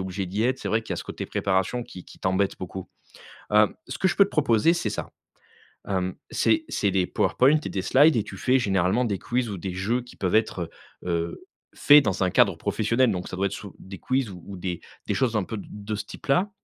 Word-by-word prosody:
obligée 95 +1 -3
d'y 100 +5 -2
être, 130 +2 +1
c'est - - -7
vrai 110 +1 +1
qu'il - - -14
y - - 0
a - - -7
ce - - -6
côté - - -6
préparation 100 +5 -1
qui 90 - -11
qui - - -15
t'embête 95 +1 0
beaucoup. 95 0 -7 0.6
Hem, 105 0 +4
ce - - -6
que 190 - +3
je 180 - 0
peux 200 - +6
te - - -10
proposer 140 +1 +3
c'est 145 -10 -1
ça. 105 - -5 0.8
Hem, 95 -2 -1 0.2
c'est 320 0 +2
c'est 100 -2 0
des 95 -2 +2
powerpoints 140 +5 +3
et - - -3
des 95 - -2
slides 145 +8 +5
et 110 - +2
tu - - -9
fais 130 +1 +2
généralement 95 +2 +1
des 100 -5 -1
quiz 120 -1 -1
ou 100 - -5
des 90 0 -5
jeux 110 +7 -1
qui 125 - -14
peuvent 95 +2 +1
être, 90 -6 0 0.3
heu, - - -5
heu, 85 0 -3 0.3
faits 145 0 +7
dans 100 -3 -1
un 90 - +2
cadre 100 -2 +4
professionnel. 110 +6 +1
Donc 90 -3 -3
ça - - -7
doit 100 - +1
être 100 - -3
sous 100 -1 -8
des 95 0 -10
quiz 130 -4 -1
ou 95 +2 -9
des 90 -1 -4 0.3
des - - +1
choses 130 -4 +1
un 105 - +2
peu 110 - -5
de 100 - -8
de 105 +1 -6
ce 105 - -5
type-là. 180 +9 0
105 Hz, 245 wpm, -25 LUFS, 95-125 Hz, 0.8 s, faits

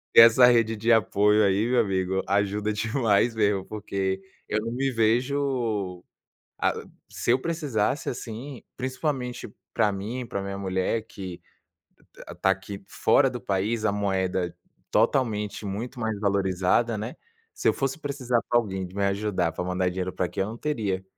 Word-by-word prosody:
Essa 115 +2 +9
rede 115 -2 +3
de 115 +2 +1
apoio 105 0 +4
aí, 100 +4 +2
meu 125 -1 +4
amigo, 95 -2 0
ajuda 100 +2 +1
demais 115 0 +2
mesmo, 100 -3 +2
porque 95 -2 -3 0.3
eu 110 - +1
não 115 +1 -4
me 135 +2 0
vejo 115 -5 0 0.6
ah, - - +2 0.4
se - - -2
eu 125 - +4
precisasse, 145 -5 -1
assim, 125 +2 -7
principalmente 130 -1 -3 0.3
para 105 - +3
mim, 115 +6 -4
para 100 -3 -3
minha 100 0 -5
mulher 95 +3 -1
que 90 -4 -8 0.9
está 95 - +1
aqui 95 +1 -3
fora - - +3
do - - -6
país, 105 +4 -1
a 100 - +3
moeda 95 -3 -1 0.3
totalmente 110 -3 +1
muito 120 +6 -5
mais 110 -2 -1
valorizada, 100 +3 +1
né, 110 +4 -5 0.4
se 410 - +1
eu - - +3
fosse 135 +2 -2
precisar 135 -5 -1
para 120 - +4
alguém 95 -5 -2
de 90 - -14
me 100 - +1
ajudar, 100 -4 0
para - - -4
mandar 90 0 0
dinheiro 90 0 -3
para - - -1
aqui, 90 - -5
eu 95 - +1
não 110 +3 -7
teria. 105 -11 -2
105 Hz, 160 wpm, -26 LUFS, 95-120 Hz, 0.9 s, Essa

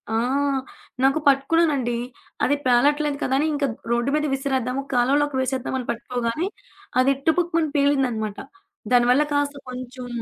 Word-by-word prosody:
ఆ! - - +2 0.9
నాకు 275 +3 +4
పట్టుకున్నానండి. 275 -3 +2 0.5
అది 285 - +2
పేలట్లేదు 290 +4 +3
కదా! 265 - +1
అని 310 - +1
ఇంకా 285 -1 0 0.2
రోడ్డు 235 +2 +1
మీద 300 0 +1
విసిరేద్దాము, 265 -1 -2
కాలువలోకి 275 +3 +2
వేసేద్దామని 260 -1 -2
పట్టుకోగానే, 245 +7 -2 0.5
అది 270 +2 +3
టుపుక్కుమని 335 -1 +2
పేలిందన్నమాట. 255 -7 +1 0.5
దానివల్ల 245 +3 +5
కాస్త 285 0 0
కొంచెం 250 0 -7
270 Hz, 115 wpm, -23 LUFS, 250-290 Hz, 0.9 s, దానివల్ల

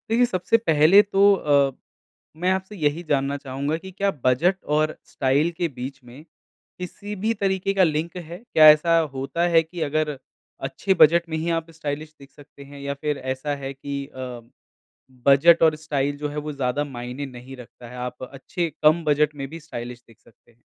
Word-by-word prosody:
देखिए 235 +2 +4
सबसे 190 +1 +1
पहले 165 -2 +5
तो 200 -1 +4
अ, 140 -5 +2 0.7
मैं 180 +3 +1
आपसे 190 +2 -3
यही 155 -1 -1
जानना 140 0 +1
चाहूँगा 140 +3 -3
कि 190 +3 -11
क्या 200 +2 0
बजट 170 +10 +2
और 155 +1 0
स्टाइल 140 +5 +1
के 175 - 0
बीच 135 0 -7
में, 125 +5 -13 0.6
किसी 205 +3 -7
भी 215 +4 -1
तरीके 195 -2 -1
का 195 -1 +4
लिंक 160 +1 -1
है? 170 0 -8 0.2
क्या 155 -1 +8
ऐसा 165 +2 +5 0.2
होता 135 +6 -1
है 165 -1 +4
कि 165 +1 -9
अगर 150 -1 -1 0.5
अच्छे 135 +9 0
बजट 170 0 +5
में 160 - -2
ही 165 +2 -2
आप 165 0 -2
स्टाइलिश 155 -1 -6
दिख 140 0 -15
सकते 140 -1 -15
हैं 140 0 -12
या 140 0 -3
फिर 150 -1 -1 0.2
ऐसा 145 +2 -4
है 135 -1 -6
कि 140 0 -5
अ, 125 -3 -8 0.8
बजट 160 +5 +6
और 160 -1 +5
स्टाइल 145 -2 -2
जो 150 +1 -3
है 145 - -7
वो 150 0 -4
ज़्यादा 140 +1 -1
मायने 125 0 -6
नहीं 130 0 -10
रखता 120 0 -13
है, 125 - -11
आप 125 +1 -6
अच्छे 140 +6 -4
कम 155 +2 +5
बजट 150 0 +2
में 135 -1 -5
भी 165 +2 -8
स्टाइलिश 120 -6 -8
दिख 115 -2 -21
सकते 115 - -25
हैं। 120 +1 -34
150 Hz, 190 wpm, -23 LUFS, 135-170 Hz, 0.8 s, क्या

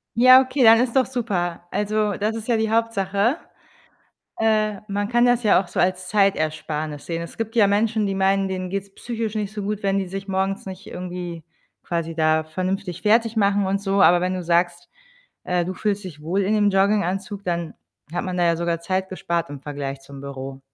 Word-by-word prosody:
Ja, 255 +2 +8
okay, 260 0 0
dann 225 0 +8
ist 250 -1 -1
doch 260 -1 +4
super. 180 -9 -3
Also, 210 +1 0
das 215 +3 -1
ist 225 -1 -6
ja 235 -2 +2
die 220 0 0
Hauptsache. 225 - +1 1.0
Äh, 215 -2 +1
man 205 +1 -2
kann 240 +1 +3
das 245 0 +3
ja 205 -3 +5
auch 185 - -15
so - - -2
als 185 0 0
Zeitersparnis 155 -6 0
sehen. 165 -1 -3
Es 170 - -9
gibt 225 0 -3
ja 210 - +6
Menschen, 210 +1 +1
die 195 - -1
meinen, 195 0 +2
denen 185 -1 -3
geht‘s 195 0 -5
psychisch 230 -2 -4
nicht 210 -1 -3
so 210 - -5
gut, 210 +1 -3
wenn 195 0 +1
die 190 - -2
sich 195 +2 -6
morgens 195 +1 -1
nicht 190 0 -8
irgendwie 175 -2 -6 0.4
quasi 165 -1 -3
da 155 0 +2
vernünftig 185 +3 -3
fertigmachen 210 -2 +2
und 195 +1 0
so, 195 0 +1
aber 175 0 +6
wenn 185 +1 -1
du 185 - -3
sagst, 175 +1 +1 0.6
äh, 180 -1 0
du 185 +2 -4
fühlst 205 0 -2
dich 155 -5 -9
wohl 180 +6 0
in 200 +3 +1
dem 205 -1 +3
Jogginganzug, 200 +1 0
dann 170 -2 -2 0.4
hat 175 - -2
man 185 -1 -3
da 175 - +2
ja 170 -1 +3
sogar 170 0 -1
Zeit 185 +2 -2
gespart 170 -2 -2
im 145 -1 -8
Vergleich 140 -1 -5
zum 135 0 -12
Büro. 135 -1 -7
195 Hz, 205 wpm, -22 LUFS, 175-210 Hz, 1.0 s, Ja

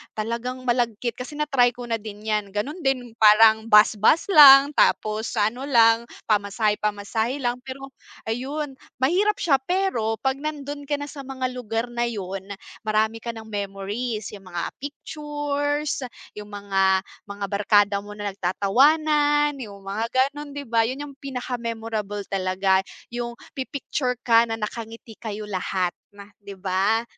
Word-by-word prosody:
talagang 235 +4 -4
malagkit 240 -1 0
kasi 255 +4 -7
na-try 270 -5 +2
ko 245 - -8
na 230 -1 -2
din 210 -1 -9
‘yan. 210 -2 -2
Ganun 280 - -3
din, 265 -6 -1
parang 220 +1 +6
bus, 210 0 +6
bus 330 - +3
lang 280 -3 +9
tapos 215 -5 +1
sa 210 -1 +2
ano 260 +4 -7
lang, 230 -3 +4 0.2
pamasahe-pamasahe 210 +3 0
lang, 245 0 0
pero 270 +1 -8 0.3
ayun, 270 +5 -4 0.2
mahirap 370 +11 +2
siya 280 -8 +2
pero 265 - 0
‘pag 265 0 0
nandun 290 -1 -5
ka 290 - +1
na 290 0 -6
sa 290 - -10
mga 260 -1 -3
lugar 240 -1 -3
na 240 0 -1
yun, 195 -4 -5 0.4
marami 220 +1 +1
ka 235 0 -6
ng 225 - -8
memories. 205 +2 -4
Yung 195 -2 -12
mga 175 -1 -4
pictures, 290 0 -3 0.3
yung 210 0 -9
mga 195 -2 +1 0.2
mga 200 0 -5
barkada 205 0 +3
mo 205 +1 -10
na 205 -1 -4
nagtatawanan, 290 - +2
yung 200 -5 -9
mga 200 +3 -2 0.3
gano’n, 290 -1 -9
‘di 285 - -4
ba? 230 -3 +1
Yun 265 +4 -4
yung - - -18
pinaka-memorable 230 -6 -4
talaga, 190 0 +2 0.3
yung 240 0 -4 0.2
pi-picture 260 -1 -3
ka 230 0 +5
na 225 - -2
nakangiti 225 0 -7
kayo 215 -2 -5
lahat, 185 -2 -1 0.5
‘di 200 -1 -10
ba. 195 +4 +1
230 Hz, 145 wpm, -24 LUFS, 210-270 Hz, 0.5 s, lang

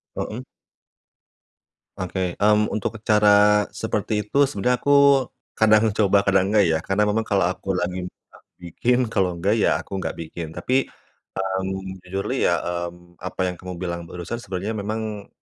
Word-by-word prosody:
Hmm. 110 - -4 1.6
Oke, 95 -1 -3
mmm, 105 +1 +3
untuk 105 - -2
cara, 105 -1 +5
seperti 110 -1 -2
itu 140 +8 +2
sebenarnya 125 -1 0
aku, 140 -1 +5 0.3
kadang 110 0 +5
coba, 100 -1 +4
kadang 95 -1 +2
enggak 105 -2 +5
ya. 80 - +2
Karena 95 +2 +1
memang 110 +2 0
kalau 95 -4 +2
aku 95 +1 -3
lagi 90 0 -2
nggak 90 - -15 0.2
bikin, 115 +8 0
kalau 95 -4 +1
enggak 95 +6 0
ya - - +2
aku 95 - -6
enggak 95 - -3
bikin. 80 0 -7
Tapi, 130 +11 0 0.6
mmm, 95 0 -4
jujurly 95 +2 -3
ya, - - +2 0.3
mmm, 85 0 -19
apa 90 - -7
yang 90 - -1
kamu 90 0 -8
bilang 85 -1 -4
barusan 90 +7 -6
sebenarnya 100 +1 -4
memang, 110 0 -4
100 Hz, 150 wpm, -23 LUFS, 90-110 Hz, 1.6 s, cara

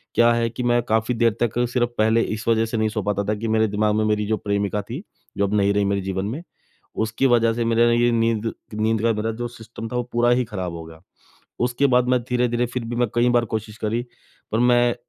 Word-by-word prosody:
क्या 120 0 +5
है 115 0 0
कि 120 +2 -5
मैं 120 0 +2
काफ़ी 110 +1 0
देर 115 0 +3
तक 120 0 -1
सिर्फ 120 -1 +1
पहले 110 +1 +3
इस 110 0 -4
वजह 115 -1 +3
से 115 +1 -3
नहीं 110 0 +1
सो 105 0 -3
पाता 100 0 -1
था 105 - +1
कि 110 +2 -4
मेरे 110 0 +2
दिमाग 105 +1 0
में 110 - +1
मेरी 105 0 +1
जो 110 0 0
प्रेमिका 100 +1 -1
थी, 120 - -7 0.4
जो 100 - +2
अब 100 - -4
नहीं 100 0 +3
रही 100 0 +1
मेरे 100 0 0
जीवन 95 0 -3
में, 135 +11 -4 0.5
उसकी 110 +4 0
वजह 115 -2 +3
से 120 0 -1
मेरा 115 +1 +3
ये 120 +1 +3
नींद, 115 -1 0 0.2
नींद 110 0 0
का 115 0 +3
मेरा 110 +1 -2
जो 120 - -2
सिस्टम 115 -1 -9
था 125 - -5
वो 125 - +1
पूरा 120 +1 +3
ही 125 +1 +3
ख़राब 95 -6 -5
हो 80 - -7
गया। 80 0 -13 0.6
उसके 125 +3 +2
बाद 125 -1 +2
मैं 125 0 +3
धीरे-धीरे 125 -1 0
फिर 120 0 -4
भी 120 +1 -4
मैं 120 -1 +1
कई 120 +1 +3
बार 120 -1 +3
कोशिश 110 -1 -5
करी 115 +2 -1 0.5
पर 110 - +1
मैं 120 0 +4
115 Hz, 245 wpm, -22 LUFS, 105-120 Hz, 0.6 s, क्या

